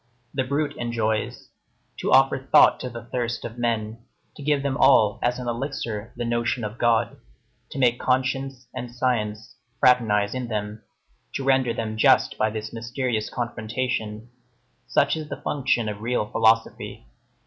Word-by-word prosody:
The 135 - 0
brute 140 +3 -1
enjoys. 110 -2 -2 0.5
To - - -1
offer 135 0 +5
thought - - +7
to 125 - -4
the 120 -1 -8
thirst 120 0 -3
of 120 +1 -7
men, 115 -2 -1 0.4
to - - -11
give 145 -1 +1
them 140 -1 -1
all 110 -7 +4
as 120 0 +1
an 125 -1 -6
elixir 120 -3 -4
the 120 - -3
notion 120 +1 -1
of 105 +2 -5
God, 115 -1 +2 0.5
to - - -8
make 125 -2 +3
conscience 130 0 -1
and 125 - -5
science 115 -3 -2 0.2
fraternize 110 -6 +3
in 130 -1 -3
them, 105 -1 -4 0.5
to 135 - -2
render 130 -2 +3
them 110 -1 -3
just - - +4
by 110 - +3
this 110 0 -6
mysterious 120 -1 -2
confrontation; 115 -1 -3 0.6
such 140 - +2
is 155 -1 -6
the - - -5
function 130 -5 0
of 105 -1 -5
real 120 -1 0
philosophy. 110 - +1
120 Hz, 155 wpm, -24 LUFS, 110-130 Hz, 0.6 s, thought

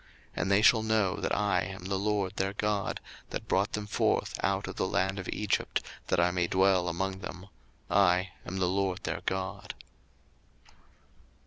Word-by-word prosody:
02:029:046 - - -3
And 90 +3 0
they 100 +1 +5
shall 115 0 +6
know 110 -4 +2
that - - -1
I 100 -2 +2
am 95 0 -6
the 95 0 -1
LORD 100 -1 -1
their 95 +1 0
God, 105 -1 -1 0.3
that - - -5
brought 100 +2 +1
them 105 -1 -2
forth 105 - +1
out - - +1
of - - -6
the - - 0
land 95 +1 0
of 90 - -6
Egypt, 105 -1 0 0.3
that 95 - +2
I 90 +1 +4
may 90 -1 +1
dwell 95 -1 +3
among 95 +3 -2
them: 90 -1 -7 0.4
I 95 -1 +3
am 95 - -5
the 95 -1 +2
LORD 95 0 0
their - - -3
God. 95 0 -3
95 Hz, 180 wpm, -30 LUFS, 90-100 Hz, 0.4 s, shall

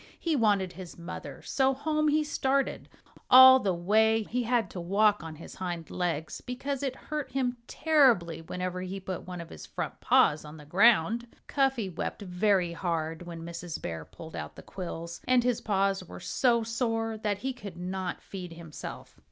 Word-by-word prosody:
He 330 -2 0
wanted 205 -7 +2
his 180 -1 -9
mother. 170 +1 -8
So 270 -1 +2
home 305 +2 0
he 305 +1 +3
started. 275 -2 0 0.4
All 260 +1 +10
the 200 -6 0
way 220 +5 +3
he 245 +4 -2
had 240 -1 +1
to 180 - -5
walk 205 +4 +3
on 160 -1 -7
his 155 - -11
hind 175 -3 -5
legs, 165 -4 -2
because 260 +2 -3
it 270 -2 -2
hurt 300 0 -5
him 250 -2 0
terribly 235 - +3
whenever 180 +2 -4
he 185 +1 -5
put 185 -1 -6
one 180 -1 -6
of 170 -1 -8
his - - -10
front - - -5
paws 150 +1 +4
on 150 +1 -10
the 150 - -12
ground. 220 +5 +4 0.2
Cuffy 270 -6 +1
wept 185 +3 -4
very 180 -1 +2
hard 165 -1 -3
when 165 -1 -7
Mrs. 170 0 -6
Bear 80 -1 -5
pulled 160 - -11
out - - -6
the - - -11
quills. 170 -2 -6
And 250 -1 +4
his 245 -2 +1
paws 195 -2 +1
were 180 - -10
so 235 -3 +2
sore 225 -1 -1
that 210 -2 -1
he 265 +5 -3
could 200 -8 -9
not 185 0 -4
feed 180 -3 -7
himself. 165 -2 -9
195 Hz, 180 wpm, -29 LUFS, 170-245 Hz, 0.4 s, All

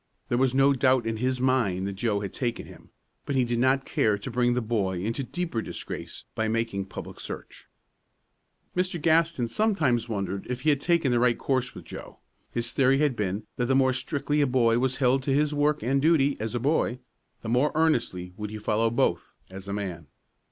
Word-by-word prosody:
There 120 - +1
was 130 -1 +2
no 135 +1 +5
doubt 130 -2 +3
in 115 0 -2
his 130 +2 -1
mind 120 -8 +1
that 100 - -3
Joe 100 +1 -1
had 100 -2 -5
taken 120 -3 -3
him; - - -15 0.3
but 140 - -3
he 130 - +3
did 120 0 -1
not 130 +2 +2
care 105 -2 +1
to 105 +6 -7
bring 120 0 +2
the - - +2
boy 100 -5 -1
into 115 +6 -2
deeper 165 -4 -3
disgrace - - -7
by 110 - -1
making 115 -3 -1
public 95 - -9
search. - - -8 1.1
Mr. 180 -1 0
Gaston 160 -5 +2
sometimes 140 - +1
wondered 100 -2 -3
if 125 0 -3
he 155 - +3
had 140 -1 0
taken 170 -6 +2
the 120 - +3
right 120 -1 +3
course 130 -2 -1
with - - -10
Joe. - - -9 0.3
His 120 0 -3
theory 135 0 +3
had 145 -3 +2
been 105 0 -2
that 120 - 0
the 135 - +2
more 130 -1 +4
strictly 145 +2 -1
a 145 - +3
boy 120 -2 +3
was 130 0 +1
held 130 0 +2
to 135 +1 0
his 150 +1 +2
work 150 -1 +1
and 135 +3 +1
duty 145 -3 +3
as 110 +2 -3
a - - 0
boy, 135 -1 +1 0.5
the 110 - -4
more 125 +5 +2
earnestly 115 - 0
would 105 -1 -4
he 110 - -6
follow 110 +2 +1
both 120 - 0 0.2
as 95 +1 -9
a - - -4
man. 90 -6 -5
125 Hz, 210 wpm, -27 LUFS, 110-140 Hz, 1.1 s, no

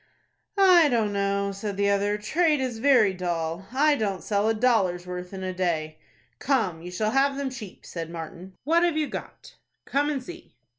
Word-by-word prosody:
"I 360 -5 +6
don't 225 -5 +1
know," 200 0 0
said 200 0 -5
the 200 0 +2
other. 205 +1 +1
"Trade 305 +8 +1
is 250 -4 -3
very 235 -7 +4
dull. 175 0 -3
I 290 +3 +3
don't 200 -7 -2
sell 205 +1 +1
a - - +3
dollar's 200 -7 +1
worth 180 0 -6
in 190 -1 -6
a 185 0 -3
day." 160 -4 -2 0.4
"Come, 215 - 0
you 175 - -8
shall 215 +4 -1
have 275 +2 +2
them 275 -2 -2
cheap," 220 -7 -10
said 165 -2 -6
Martin. 170 +3 -8
"What 330 +5 +3
have 345 -3 +1
you 310 - +1
got?" - - -9 0.3
"Come 285 +2 0
and 275 -4 -2
see." 345 +5 -12
205 Hz, 190 wpm, -26 LUFS, 185-270 Hz, 0.4 s, I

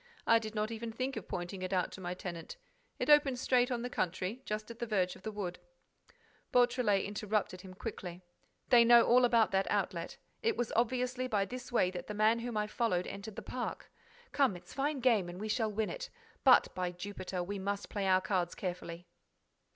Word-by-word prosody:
I 230 - +6
did 220 -1 -7
not 215 +1 -1
even 230 0 -5
think 255 +4 -3
of 220 - -6
pointing 175 +2 -5
it 185 0 -3
out 180 -2 +1
to 190 - -9
my 180 0 -3
tenant. 180 - -7 0.4
It - - -2
opens 290 -4 +5
straight 250 -1 +3
on 240 -2 -2
the - - -1
country, 185 +6 -2
just 215 +1 -4
at 235 - -11
the 235 - -3
verge 185 -4 +1
of - - -15
the 220 - -4
wood." 195 -4 -4 0.9
Beautrelet 245 -5 +3
interrupted 205 -2 -2
him 185 -1 -11
quickly: 185 -4 -6 0.5
"They 240 -2 +8
know 235 0 +8
all 250 +1 +6
about 230 -3 +4
that 195 0 +1
outlet. 185 -4 -1 0.2
It 455 -2 +1
was 240 - -1
obviously 250 +2 0
by 205 -5 +1
this 250 +5 -8
way 185 -6 +3
that 180 - -6
the 210 - -5
man 215 +2 +3
whom 235 -1 -4
I 210 - +1
followed 210 -5 0
entered 200 +1 -7
the - - -6
park. 250 -1 -5 0.4
Come, 275 -8 +3
it's 175 - -12
fine 280 0 -1
game 225 -8 +3
and 175 +1 -8
we 215 - -4
shall 220 -1 +1
win 215 +1 -1
it. - - -6 0.3
But, 260 -2 +6
by 180 -1 -2
Jupiter, 185 -1 -5
we 200 +2 -4
must 200 +1 -3
play 200 -2 -2
our 185 0 +4
cards 180 -3 -1
carefully!" 175 -2 -5
215 Hz, 205 wpm, -33 LUFS, 185-245 Hz, 0.9 s, They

